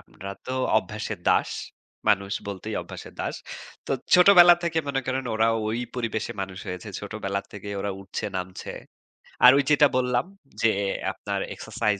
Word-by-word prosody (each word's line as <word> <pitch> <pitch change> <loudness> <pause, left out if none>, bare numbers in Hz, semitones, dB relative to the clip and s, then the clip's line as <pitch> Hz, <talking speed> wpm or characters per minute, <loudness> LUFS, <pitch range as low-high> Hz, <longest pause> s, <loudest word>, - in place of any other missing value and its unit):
আমরা 100 - -10 0.2
তো 130 - -3 0.3
অভ্যাসের - - -5
দাস। - - +3 0.6
মানুষ 100 0 +2 0.2
বলতেই 95 -2 -5
অভ্যাসের - - -10
দাস। - - -2 0.5
তো - - -1 0.2
ছোটবেলা 180 -1 +9
থেকে 165 -1 0
মনে 135 -1 0
করেন 130 0 -1
ওরা 110 +1 +3 0.2
ওই 115 +2 -1 0.2
পরিবেশে 115 -3 -2
মানুষ 95 -1 -5
হয়েছে। 90 +2 -6
ছোটবেলা 100 -1 -3
থেকে 105 0 -8
ওরা 100 - -2
উঠছে, 100 0 -5
নামছে। 90 0 -5 0.7
আর 125 - +12
ওই 140 - +3
যেটা 150 0 +6
বললাম 125 0 +1 0.4
যে 115 - +5 0.4
আপনার - - -4
এক্সারসাইজ 105 -3 -1
110 Hz, 150 wpm, -25 LUFS, 100-130 Hz, 0.7 s, আর